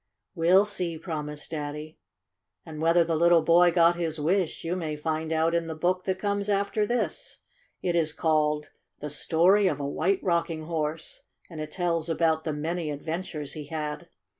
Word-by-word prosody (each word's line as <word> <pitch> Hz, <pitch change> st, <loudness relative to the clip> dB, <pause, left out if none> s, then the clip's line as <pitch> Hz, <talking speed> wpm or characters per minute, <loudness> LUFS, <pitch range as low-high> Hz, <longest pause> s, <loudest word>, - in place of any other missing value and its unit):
"We'll 180 Hz, +3 st, +4 dB
see," 180 Hz, -5 st, -3 dB
promised 150 Hz, -3 st, -5 dB
Daddy. 150 Hz, 0 st, -5 dB, 0.7 s
And 155 Hz, -1 st, -8 dB
whether 165 Hz, +1 st, +4 dB
the 165 Hz, 0 st, -1 dB
little 170 Hz, 0 st, +5 dB
boy 175 Hz, +2 st, +6 dB
got 170 Hz, 0 st, +4 dB
his 165 Hz, -2 st, -2 dB
wish 175 Hz, +3 st, 0 dB
you 170 Hz, +2 st, -1 dB
may 160 Hz, -4 st, -3 dB
find 160 Hz, +1 st, -3 dB
out 160 Hz, +1 st, +2 dB
in 170 Hz, -1 st, 0 dB
the 160 Hz, -, -4 dB
book 180 Hz, +3 st, 0 dB
that 190 Hz, -1 st, 0 dB
comes 200 Hz, +1 st, -1 dB
after 205 Hz, +1 st, +1 dB
this. 240 Hz, +2 st, -2 dB, 0.5 s
It 175 Hz, -2 st, 0 dB
is 160 Hz, -2 st, +2 dB
called 150 Hz, -2 st, 0 dB, 0.3 s
"The 150 Hz, -, -5 dB
Story 180 Hz, +7 st, +3 dB
of 145 Hz, -6 st, -1 dB
a 140 Hz, -, -3 dB
White 185 Hz, +7 st, 0 dB
Rocking 170 Hz, -3 st, 0 dB
Horse," 155 Hz, -1 st, -3 dB, 0.3 s
and 160 Hz, -2 st, -6 dB
it 155 Hz, -, -5 dB
tells 170 Hz, -1 st, -1 dB
about 160 Hz, -1 st, +1 dB
the 160 Hz, -, -1 dB
many 160 Hz, +2 st, -3 dB
adventures 155 Hz, 0 st, -4 dB
he 150 Hz, -2 st, -7 dB
had. 150 Hz, -1 st, -4 dB
165 Hz, 175 wpm, -27 LUFS, 155-175 Hz, 0.7 s, boy